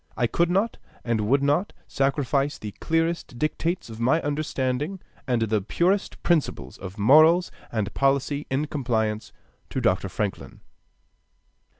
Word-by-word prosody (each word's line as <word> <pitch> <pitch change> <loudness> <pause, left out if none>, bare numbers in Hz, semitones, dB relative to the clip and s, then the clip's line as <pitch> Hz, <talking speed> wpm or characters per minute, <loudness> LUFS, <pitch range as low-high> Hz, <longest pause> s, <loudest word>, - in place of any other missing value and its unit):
I 120 - +2
could 170 +8 +1
not 195 +6 0 0.2
and 110 -3 0
would 140 +2 +3
not 145 +8 +1
sacrifice 140 +1 0
the 105 - -6
clearest 165 -5 -1
dictates 165 +5 -1
of 110 -1 -9
my 130 +8 +3
understanding 145 +3 -2 0.3
and 120 -3 +1
the 110 -1 +1
purest 180 - 0
principles 170 -4 0
of 95 +2 -8
morals 155 - +6 0.2
and 105 -3 -2
policy 140 +1 +1
in 135 +3 0
compliance 110 -7 -1 0.4
to - - -2
Dr. - - +1
Franklin. - - -4
140 Hz, 130 wpm, -25 LUFS, 115-160 Hz, 0.4 s, morals